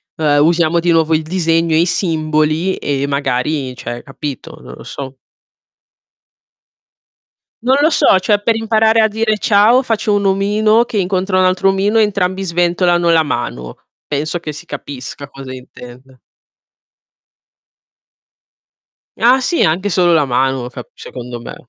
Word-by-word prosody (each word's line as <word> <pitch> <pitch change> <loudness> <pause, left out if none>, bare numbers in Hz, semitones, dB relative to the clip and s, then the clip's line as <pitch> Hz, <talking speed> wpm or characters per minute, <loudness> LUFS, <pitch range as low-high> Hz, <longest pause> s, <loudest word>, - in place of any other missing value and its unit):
uhm, 145 -2 +2
usiamo 170 0 +2
di 175 0 +1
nuovo 165 -1 +2
il 155 - -1
disegno, 165 -1 0
e 160 - +3
i - - +2
simboli, 160 0 0
e 140 -1 -2
magari 135 -1 -2
cioè, 120 0 -7
capito? 140 -1 -8
Non - - -11
lo - - -12
so. 135 -1 -8 2.5
Non 255 +2 +3
lo 310 - +4
so, 240 - +4
cioè, 205 +2 +1
per 225 +2 +1
imparare 225 0 +2
a 220 - +3
dire 215 0 -1
"ciao" 220 +5 +3
faccio 220 -3 -1
un 200 0 0
omino 210 +4 +2
che 225 - -5
incontra 185 0 0
un 185 - +3
altro 185 +1 +1
omino, 195 +3 +1
e - - +5
entrambi 190 -2 -1
sventolano 175 -1 +1
la 165 -1 +4
mano. 60 - -4 0.3
Penso 155 +4 -2
che 155 -3 -6
si 150 - -11
capisca 140 0 -8
cosa 135 -2 -10
intende. 125 0 -13 3.0
Ah, 250 +3 +4
sì 335 +7 +1
anche 180 +6 0
solo 175 -2 +2
la 155 -3 +3
mano 130 0 -1
cap 125 -1 -10
secondo 125 -1 -9
me. - - -9
170 Hz, 145 wpm, -16 LUFS, 140-200 Hz, 3.0 s, e